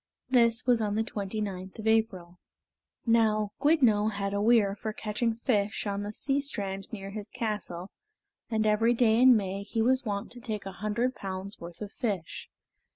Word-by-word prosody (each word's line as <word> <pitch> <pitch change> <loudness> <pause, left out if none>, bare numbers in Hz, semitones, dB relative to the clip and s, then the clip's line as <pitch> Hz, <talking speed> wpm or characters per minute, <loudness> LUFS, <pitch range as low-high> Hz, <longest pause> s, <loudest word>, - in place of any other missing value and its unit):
This 235 -1 +4
was 245 -2 +3
on 205 -1 0
the 220 - +1
twenty 210 -1 -4
ninth 190 -2 -5
of 220 - -7
April. 195 -6 0 0.7
Now 215 -3 +3
Gwyddno 245 -9 +4
had 200 -1 -3
a 200 - 0
weir 215 -3 +4
for 215 +1 -5
catching 220 +2 -1
fish 215 -4 0
on 200 -1 -2
the 205 0 -4
sea 275 +5 0
strand 195 -8 -4
near 195 -3 -6
his 210 0 -5
castle, 210 -6 -4 0.6
and 220 -1 0
every 225 +3 +3
day 230 -1 +4
in 255 -2 +8
May 195 -1 -3
he 210 +3 -4
was 255 +4 +3
wont 205 -3 -3
to 245 - -6
take 220 -5 -4
a 195 - -5
hundred 215 +6 -1
pounds' 195 -1 -6
worth 170 +2 -10
of 205 -1 -5
fish. 205 -11 -4
215 Hz, 180 wpm, -29 LUFS, 200-230 Hz, 0.7 s, in